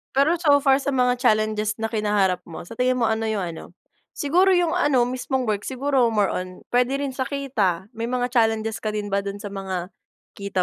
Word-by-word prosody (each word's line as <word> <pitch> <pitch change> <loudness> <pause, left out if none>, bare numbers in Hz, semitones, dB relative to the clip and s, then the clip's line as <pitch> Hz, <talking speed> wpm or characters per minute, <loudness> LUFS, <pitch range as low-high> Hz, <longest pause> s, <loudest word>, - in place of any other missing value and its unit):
Pero 305 +6 +3
so 290 -4 +4
far 270 -1 +4
sa 280 0 -2
mga 250 -1 +2
challenges 215 -3 +1
na 225 - -1
kinaharap 205 -4 +1
mo, 165 - -8
sa 225 +6 -12
tingin 255 0 +2
mo 225 - +2
ano 220 0 -1
yung 215 -3 -1
ano, 165 - -9 0.5
siguro 360 +6 +3
yung 350 -2 +2
ano 270 -6 +2
mismong 260 +1 -2
work, 210 -4 -2
siguro 265 -1 +1
more 210 -4 +1
on 185 0 -5
puwede 250 +2 +2
rin 280 - -2
sa 260 0 -3
kita 215 - -1
may 230 +1 -5
mga 250 0 -1
challenges 225 -2 +1
ka 215 -1 -3
din 205 -1 -3
ba 200 - +1
dun 200 +1 -5
sa 205 - -6
mga 190 -2 -4 0.5
kita 200 -2 -1
225 Hz, 210 wpm, -23 LUFS, 205-265 Hz, 0.5 s, so